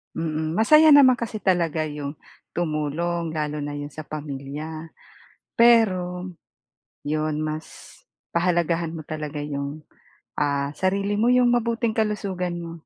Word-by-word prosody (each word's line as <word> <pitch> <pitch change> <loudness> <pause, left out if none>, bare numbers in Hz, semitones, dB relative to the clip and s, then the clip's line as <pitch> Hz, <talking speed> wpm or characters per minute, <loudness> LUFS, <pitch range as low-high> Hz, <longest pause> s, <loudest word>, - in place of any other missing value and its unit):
Mm, 160 0 -2
masaya 305 +8 +6
naman 260 -3 +7
kasi 220 -2 -4
talaga 170 -4 +1
'yong 145 -1 -5 0.4
tumulong 165 +1 -2
lalo 150 -1 -2
na 145 0 -4
'yon 145 0 -6
sa 155 +1 -8
pamilya, 150 +2 -6 0.7
pero 185 -6 +3 0.7
'yon 155 0 -1
mas 155 +1 -7 0.3
pahalagahan 170 -1 +1
mo 155 - -7
talaga 150 -1 -5
'yong, 145 +1 -5 0.6
ah, 140 -1 0
sarili 200 +2 0
mo 225 - +2
'yong 250 -1 +4
mabuting 235 -1 0
kalusugan 195 -5 -1
mo. 165 0 -7
165 Hz, 120 wpm, -24 LUFS, 150-195 Hz, 0.7 s, naman